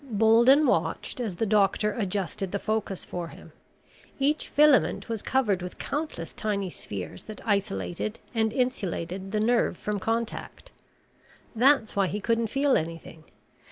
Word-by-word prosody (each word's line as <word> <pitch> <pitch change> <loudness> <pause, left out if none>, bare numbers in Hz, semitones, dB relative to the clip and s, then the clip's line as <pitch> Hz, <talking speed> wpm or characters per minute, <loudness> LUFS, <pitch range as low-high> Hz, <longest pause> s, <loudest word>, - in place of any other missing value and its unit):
Bolden 235 +4 +5
watched - - 0
as 220 -7 -3
the 225 - 0
doctor 210 0 +2
adjusted 195 -3 -2
the 200 - 0
focus 215 -2 -2
for 175 -1 -5
him. - - -13 0.7
Each 290 +3 +1
filament 295 -2 +4
was 225 -3 -3
covered 215 -8 +1
with 180 0 -7
countless 290 - -4
tiny 200 -3 -2
spheres 95 - -7
that 215 - -8
isolated 105 - -1
and 220 -1 +1
insulated 195 -6 -2
the 215 - 0
nerve 230 +2 +2
from 210 -1 -3
contact. 230 - -3 0.8
That's 250 -1 +4
why 200 -1 +2
he 205 - -3
couldn't 230 +2 +1
feel 275 +3 +2
anything. 165 -1 -6
215 Hz, 140 wpm, -27 LUFS, 190-240 Hz, 0.8 s, Bolden